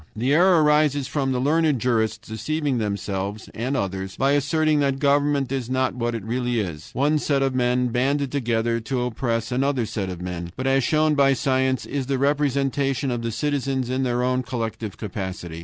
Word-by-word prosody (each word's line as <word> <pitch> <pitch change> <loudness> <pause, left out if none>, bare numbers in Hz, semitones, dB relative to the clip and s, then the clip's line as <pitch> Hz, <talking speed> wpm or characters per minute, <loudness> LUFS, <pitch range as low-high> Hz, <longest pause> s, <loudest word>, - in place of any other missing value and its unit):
The 125 +6 +1
error 175 0 +5
arises 150 -2 +3
from 140 -1 -1
the 125 - 0
learned 150 +1 +2
jurists 115 -2 0
deceiving 140 +4 -2
themselves 100 0 -3
and 130 +5 -2
others, 95 -2 -3
by 135 +1 +2
asserting 150 +2 +2
that 140 -2 +1
government 140 -1 +2
is 130 -3 -2
not 130 0 +1
what 120 -1 -2
it 110 - -5
really 120 +1 -1
is, 85 -7 -5
one 150 +4 +2
set 140 -2 +1
of 135 -1 0
men 125 0 +1
banded 135 +3 0
together 115 -3 0
to 125 +2 -2
oppress 115 -1 -2
another 130 -1 +1
set 105 -3 -3
of 90 -2 -6
men, 90 -1 -5
but, 130 - -4
as 135 0 +3
shown 155 +3 +2
by 140 -1 +4
science, 130 0 0
is 135 -3 -3
the 135 -1 0
representation 140 -1 0
of 120 -1 -2
the 115 0 -2
citizens 135 -1 -1
in 130 +1 0
their 125 -2 0 0.2
collective 115 -4 -4
capacity. 95 -4 -5
130 Hz, 185 wpm, -23 LUFS, 115-140 Hz, 0.2 s, error